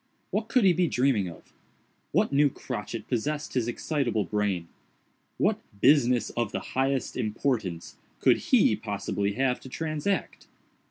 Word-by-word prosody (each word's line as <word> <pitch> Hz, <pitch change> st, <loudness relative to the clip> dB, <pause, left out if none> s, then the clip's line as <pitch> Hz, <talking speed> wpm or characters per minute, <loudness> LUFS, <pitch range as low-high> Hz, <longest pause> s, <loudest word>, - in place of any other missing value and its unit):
What 215 Hz, +1 st, -1 dB
could 235 Hz, +1 st, +3 dB
he 190 Hz, -2 st, +6 dB
be 175 Hz, 0 st, +2 dB
dreaming 125 Hz, -, +2 dB
of? 85 Hz, -, -14 dB, 0.6 s
What -, -, +2 dB
new 145 Hz, +1 st, +5 dB
crotchet 115 Hz, -3 st, -6 dB
possessed 145 Hz, +5 st, -2 dB
his 125 Hz, -3 st, 0 dB
excitable 120 Hz, -4 st, -1 dB
brain? 100 Hz, -5 st, -1 dB, 0.7 s
What -, -, +2 dB, 0.2 s
"business 125 Hz, -2 st, +4 dB
of 115 Hz, -3 st, -2 dB
the -, -, -2 dB
highest 135 Hz, 0 st, 0 dB
importance" 110 Hz, -6 st, -2 dB, 0.2 s
could -, -, +5 dB
he -, -, +5 dB
possibly 100 Hz, 0 st, -2 dB
have 125 Hz, +2 st, +1 dB
to 130 Hz, -, -11 dB
transact? 160 Hz, +7 st, -2 dB
125 Hz, 140 wpm, -27 LUFS, 110-145 Hz, 0.7 s, he